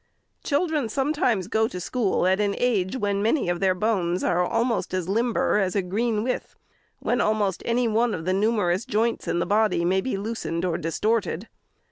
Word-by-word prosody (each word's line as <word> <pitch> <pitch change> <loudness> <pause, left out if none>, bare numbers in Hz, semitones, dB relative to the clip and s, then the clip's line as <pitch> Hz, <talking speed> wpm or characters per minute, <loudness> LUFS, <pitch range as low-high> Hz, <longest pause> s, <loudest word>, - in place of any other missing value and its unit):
Children 295 -4 0
sometimes 260 - 0
go 220 +1 +1
to 180 - -6
school 200 0 0
at 190 +2 +3
an 205 -1 +1
age 225 -3 0
when 200 -3 -1
many 225 - +1
of 175 0 -1
their 190 -1 +2
bones 185 -3 0
are 180 0 +2
almost 230 0 0
as 180 -2 -2
limber 225 +1 +1
as 190 -2 0
a 200 - +1
green 210 +4 -1
with, 250 +1 -3 0.4
when - - 0
almost 210 -4 0
any 240 +1 +2
one 225 +1 +1
of 160 - -6
the 185 - +1
numerous 200 -2 +1
joints 230 -1 -1
in - - 0
the - - 0
body 210 -4 +2
may 190 +2 +2
be 255 -1 -2
loosened 195 -5 -3
or 175 -3 -1
distorted. 205 +3 -1
210 Hz, 185 wpm, -25 LUFS, 185-230 Hz, 0.4 s, at